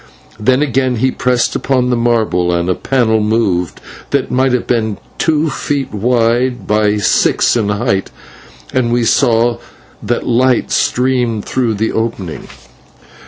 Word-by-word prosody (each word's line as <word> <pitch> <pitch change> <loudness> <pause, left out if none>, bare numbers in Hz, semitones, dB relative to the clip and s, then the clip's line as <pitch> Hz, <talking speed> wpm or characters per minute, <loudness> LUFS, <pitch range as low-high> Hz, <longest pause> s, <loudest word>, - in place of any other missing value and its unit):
Then 130 +6 +2
again 130 -2 0
he 130 +3 +1
pressed 125 -2 0
upon 125 -2 0
the - - +2
marble, 110 -7 +1
and 85 0 -1
a 90 - +2
panel 115 0 +1
moved 105 -6 0 0.3
that 140 -2 -1
might 130 +1 +2
have 125 -1 0
been 110 -4 -1 0.2
two 155 -1 +1
feet 140 -2 -3
wide 120 +1 0
by 105 0 +1
six 105 - +2
in 110 -4 0
height, 105 -2 -1 0.6
and 120 -2 +1
we 120 0 +1
saw 120 -1 +2 0.4
that 120 - -2
light 125 +1 +1
streamed 125 -4 0
through 120 -4 -1
the 110 +2 -1
opening. 110 -7 -4
120 Hz, 140 wpm, -15 LUFS, 110-125 Hz, 0.6 s, Then